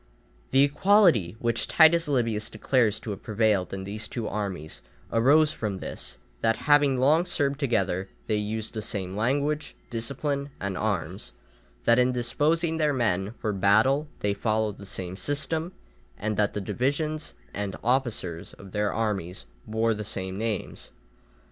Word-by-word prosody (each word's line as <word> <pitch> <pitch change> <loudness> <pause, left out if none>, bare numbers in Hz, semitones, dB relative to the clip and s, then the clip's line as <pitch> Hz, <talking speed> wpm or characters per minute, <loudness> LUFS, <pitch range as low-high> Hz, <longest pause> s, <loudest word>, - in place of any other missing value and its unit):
The 135 +1 +5
equality 145 - +4
which 115 0 -1
Titus 165 0 +5
Livius 115 -6 0
declares 110 -1 +1
to 110 - -5
have 100 - -6
prevailed 110 -4 +1
in 95 -1 -4
these 105 +3 -4
two 115 -3 -4
armies, 95 -7 -4 0.3
arose 145 +7 +5
from 105 -4 -3
this, - - -6 0.2
that 115 0 +2
having 145 -2 +5
long 150 +6 +4
served 140 -5 0
together 95 -8 0 0.2
they 110 - 0
used 105 +1 -3
the 110 - -3
same 95 -3 -4
language, 145 +7 0 0.2
discipline, 140 +4 -2
and 100 -1 -3
arms; 90 - -3 0.5
that 115 +1 +5
in 125 +1 +4
disposing 155 +7 +1
their 150 -2 +2
men 105 -4 0
for 105 -2 -2
battle 110 +10 +3
they 100 -1 +1
followed 110 0 -1
the 100 - -10
same 95 -1 -5
system; 150 - -2 0.5
and 110 +1 -2
that 105 0 +1
the 105 - -1
divisions 145 - -2 0.2
and 100 -1 -3
officers 120 -9 -1
of 100 -1 -13
their 105 0 0
armies 95 - -2 0.2
bore 110 +1 +1
the 105 0 -5
same 95 -2 -3
names. 110 0 -3
110 Hz, 150 wpm, -27 LUFS, 100-140 Hz, 0.5 s, The